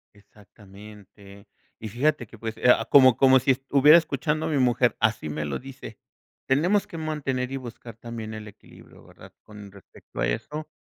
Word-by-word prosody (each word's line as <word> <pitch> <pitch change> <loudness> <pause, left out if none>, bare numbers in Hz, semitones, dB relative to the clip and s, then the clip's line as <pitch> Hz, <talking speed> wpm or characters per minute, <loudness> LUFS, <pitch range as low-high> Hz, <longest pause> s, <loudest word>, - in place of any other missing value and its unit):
Exactamente, 100 -1 -17 0.3
y 110 - -7
fíjate 125 +3 -1
que 115 - -15
pues, 110 0 -6
eh, - - -8
ah, 115 -2 +4
como 130 -3 +7
como 130 -1 +5
si 130 - +1
est 130 +1 -3
hubiera 145 +3 +7
escuchando 155 -1 -2
a - - -3
mi 150 - -1
mujer, 125 -1 +2
así 110 -8 -1
me 75 0 -4
lo 70 -2 -3
dice. 130 -5 -12 0.5
Tenemos 175 +10 +1
que 165 - -10
mantener 140 -5 -3
y - - -4
buscar 120 -3 -10
también 115 -1 -8
el 110 -1 -9
equilibrio, - - -18
¿verdad?, - - -16
con 105 -2 -13
respecto 100 -2 -15
a 65 - +1
eso. 150 - -5
120 Hz, 185 wpm, -24 LUFS, 105-135 Hz, 0.5 s, como